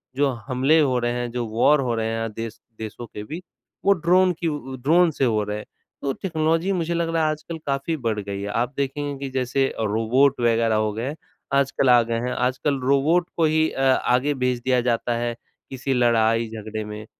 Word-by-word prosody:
जो 140 +1 +2 0.2
हमले 135 +5 +3
हो 130 -5 +2
रहे 120 0 0
हैं 120 -1 -3
जो 120 -1 -2
वॉर 120 +7 +3
हो 125 -3 -1
रहे 110 0 -1
हैं 115 0 -2
देश 115 0 -6 0.2
देशों 110 +2 -6
के 105 - -8
बीच 165 +10 -7 0.4
वो 200 - +6
ड्रोन 180 +1 +3
की 170 - -1
उ 140 -4 -4
ड्रोन 170 +4 +5
से 135 - 0
हो 110 -3 +1
रहे 105 0 -3
हैं, 105 - -8 0.4
तो 135 - -1
टेक्नोलॉजी 165 +2 0
मुझे 170 -1 -1
लग 170 -1 0
रहा 160 - +2
है 155 - +2
आजकल 155 +2 -6
काफ़ी 140 +4 -1
बढ़ 110 -2 0
गई 100 -1 -5
है। 100 - -4
आप 120 +5 -1
देखेंगे 140 +1 -2
कि - - -4
जैसे 130 +1 0
अ, 110 - -4
रोबोट 115 +7 +2
वगैरह 115 -1 +2
हो 110 0 0
गए 125 +7 -4 0.4
आजकल 135 -1 +2
आ 120 -1 +7
गए 115 0 -2
हैं - - -2
आजकल 130 +3 0
रोबोट 160 +6 +3
को 165 - +3
ही 155 0 +2
अ, - - -4
आगे 130 +3 +1
भेज 125 -1 0
दिया 130 -1 +3
जाता 120 0 0
है 120 0 -2 0.3
किसी 135 +1 -2
लड़ाई-झगड़े 115 -2 +1
में 105 0 -7
130 Hz, 210 wpm, -23 LUFS, 115-150 Hz, 0.4 s, आ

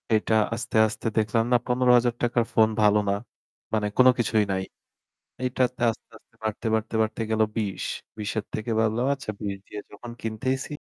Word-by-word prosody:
এটা 110 +1 +1 0.2
আস্তে, 115 0 -6
আস্তে 110 - -5
দেখলাম 110 +1 +2
না - - +7
৳১৫,০০০ 120 -1 +3
ফোন 110 -1 +5
ভালো 105 0 +5
না। - - +3 0.6
মানে 105 -1 +1
কোনো 130 0 +8
কিছুই 110 -2 +2
নাই। 95 0 -1 0.8
এইটাতে 125 -1 0
আস্তে, 110 - -11
আস্তে, - - -39
বাড়তে, 110 +1 -3
বাড়তে, 110 +1 -2
বাড়তে, 110 +1 -3
গেল 110 0 0 0.2
২০। 105 -4 -2 0.3
২০ 105 -1 -3
এর 105 - -2
থেকে 110 +2 -3
ভাবলাম, 110 +3 +1
"আচ্ছা 135 -5 -6
২০ 100 -1 -3
দিয়ে 105 - -7
যখন 120 +3 -10
কিনতেইছি" 130 +6 -2
110 Hz, 165 wpm, -25 LUFS, 105-120 Hz, 0.8 s, কোনো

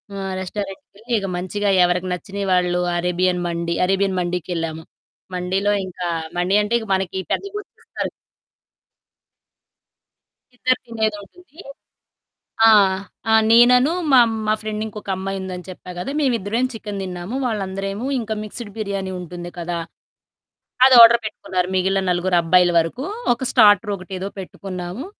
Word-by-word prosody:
ఆ! - - -5 0.2
రెస్టారెంట్‌కెళ్ళి 200 +4 -7
ఇక 195 - -4
మంచిగా 200 +3 -1
ఎవరికి 180 +1 0
నచ్చిన 195 +3 -7 0.2
వాళ్ళు 180 0 +1 0.2
అరేబియన్ 180 +1 0
మండీ 170 0 -2
అరేబియన్ 195 -1 +1
మండీకెళ్ళాము. 165 -2 -3 0.5
మండీలో 190 +3 0 0.2
ఇంకా 180 -1 -5 0.3
మండీ 180 +3 +1
అంటే 215 +3 0 0.2
మనకి 190 0 -3 0.2
పెద్ద - - -2
గు 415 - -2 0.2
ఇస్తారు. - - -4 2.5
ఇద్దరు 255 +1 +1
తినేదుంటుంది. 225 - -5 1.1
ఆ! - - +8 0.6
ఆ! - - +5 0.2
నేననూ, 250 +5 +6 0.2
మా 260 - +8 0.3
మా 215 - +3
ఫ్రెండ్ 215 0 -3
ఇంకొక 210 -2 -8
అమ్మాయి 195 +1 -4
ఉందని 185 -1 -7
చెప్పా 180 0 -9
కదా! 225 - -4
మేమిద్దరమే 235 -5 0
చికెన్ 210 -3 -6
తిన్నాము. 180 +5 -6
వాళ్ళందరేమో 195 0 -3
ఇంకా 220 -2 -3
మిక్స్డ్ 215 0 -7
బిర్యానీ 200 -3 -3
ఉంటుంది 175 0 -8
కదా! 170 0 -3 1.1
అదార్డర్ 235 -2 +9
పెట్టుకున్నారు. 185 -4 -2
మిగిలిన 190 +1 +1
నలుగురు 180 0 +1
అబ్బాయిల 175 +1 +4
వరకు. 165 - -3 0.3
ఒక 250 +2 -5
స్టార్టరొకటేదో 200 -3 +3
పెట్టుకున్నాము. 185 - -6
195 Hz, 120 wpm, -21 LUFS, 180-215 Hz, 2.5 s, అదార్డర్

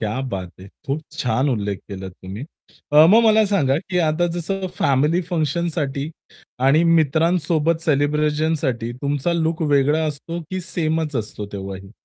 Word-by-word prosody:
क्या 110 +3 -2
बात 95 -5 -5
है! 95 - -11 0.2
खूप 140 +3 -1 0.2
छान 125 +3 0
उल्लेख 100 -6 -1
केलात 95 -2 -7
तुम्ही. 95 +7 -8 0.5
अ, 150 +2 +8
मग 225 +3 +6
मला 220 0 +5
सांगा 150 -10 +2
की 180 +2 -3
आता 165 +3 +1
जसं 190 +3 -3
फॅमिली 150 +6 +2
फंक्शनसाठी 155 -3 -1 0.6
आणि 155 +4 +5
मित्रांसोबत 165 0 +2
सेलिब्रेशनसाठी 150 -4 0
तुमचा 145 +4 0
लूक 165 -1 0
वेगळा 145 +3 +3
असतो 155 +3 -5
की 185 0 -2
सेमचं 160 -4 -1
असतो 105 -1 -7
तेव्हाही? 95 -1 -7
150 Hz, 140 wpm, -21 LUFS, 130-165 Hz, 0.6 s, अ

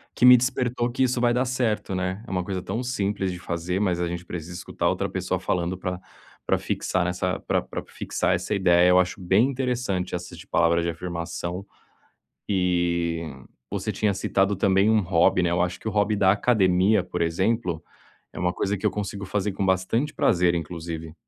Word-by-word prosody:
que - - +3
me 125 0 +10
despertou 125 -1 0
que 130 +2 0
isso 125 -1 +1
vai 120 -1 +3
dar 125 +1 +2
certo, 115 -6 -1
né, 95 +3 -2
é 120 - -9
uma 90 - 0
coisa 95 -1 -3
tão 110 +7 -3
simples 100 -6 -1
de - - -6
fazer, 90 +2 -2
mas 90 -4 +1
a 85 - 0
gente 85 0 -4
precisa 85 0 -6
escutar 90 - -3
outra - - 0
pessoa - - -2
falando 90 +1 -1
pra 90 0 -4 0.5
pra - - +2
fixar 95 - -1
nessa 90 +1 -1
pra - - 0
pra - - -6
fixar - - -1
essa - - -3
ideia. 90 -2 +4
Eu 90 0 +6
acho 90 +3 0
bem 95 +6 +3
interessante 125 -9 -2
essa 90 -1 -7
de 95 +3 -12
palavra 85 -2 +3
de 85 - -1
afirmação. 85 +2 -5 0.8
E 85 -3 +1 0.5
você - - -2
tinha 105 -2 0
citado 95 +1 +1
também 95 +2 +3
um 110 -1 +4
hobby, 90 0 +3
né, 85 - +1
eu 85 0 +1
acho 90 0 -1
que - - -7
o - - 0
hobby 105 +1 +2
da 95 -2 +4
academia, 100 -2 +3
por 90 -2 -4
exemplo, 90 +1 0 0.5
é - - -7
uma 90 0 0
coisa 100 +1 -1
que 100 - -6
eu - - +5
consigo 100 -1 -4
fazer 105 +1 -1
com 100 0 -1
bastante 95 +10 0
prazer, 85 -1 +2
inclusive. 80 -1 -5
95 Hz, 195 wpm, -25 LUFS, 90-105 Hz, 0.8 s, me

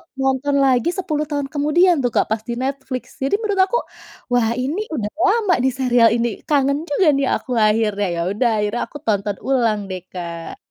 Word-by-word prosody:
nonton 270 +1 0
lagi 260 +3 +3
10 310 -6 -2
tahun 285 -2 -2
kemudian 300 +3 +3
tuh 245 - +1
Kak, - - +3
pas 220 - +1
di 235 - -2
Netflix 265 -1 -3 0.2
jadi 275 +8 +1
menurut 405 -3 +1
aku 475 - 0 0.5
wah 240 -2 +3
ini 275 +9 -2 0.2
udah 210 -4 -3
lama 410 -2 +3
di 265 - +3
serial 245 -3 +4
ini 240 0 +1 0.2
kangen 280 -1 +2
juga 310 +4 +2
nih 275 -1 +1
aku 255 - -7 0.2
akhirnya. 210 -2 +1
Ya 170 - -2
udah 235 +4 +1
akhirnya 220 +4 -1
aku 290 - -9
tonton 205 -1 0
ulang 235 -6 +2
deh 185 -1 -5
Kak. 170 -2 -7
265 Hz, 185 wpm, -20 LUFS, 225-290 Hz, 0.5 s, serial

